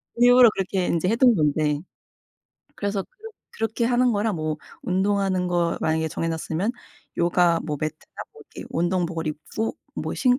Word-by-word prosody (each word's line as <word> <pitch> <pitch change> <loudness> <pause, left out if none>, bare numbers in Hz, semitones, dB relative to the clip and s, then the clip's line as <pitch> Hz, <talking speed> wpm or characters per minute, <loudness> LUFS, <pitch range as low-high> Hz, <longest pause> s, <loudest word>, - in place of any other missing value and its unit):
일부러 245 0 +7
그렇게 190 -1 -1
인제 170 +2 0
해둔 235 +1 +5
건데. 150 -1 +1 1.0
그래서 200 -1 -2
그렇 445 - -13 0.2
그렇게 225 +1 -1
하는 245 +1 +3
거랑 210 0 0
뭐 155 -1 -2 0.3
운동하는 190 -1 +1
거 175 -1 0
만약에 160 0 0
정해놨으면 165 +6 -2 0.5
요가 170 0 +3
뭐 150 -2 -3
매트나 155 +1 -6 0.2
뭐 - - -14
이렇게 - - -8
운동복을 170 -1 -1
입고 185 - -4 0.2
뭐 - - -3
신 250 0 +3
185 Hz, 325 characters per minute, -24 LUFS, 160-225 Hz, 1.0 s, 일부러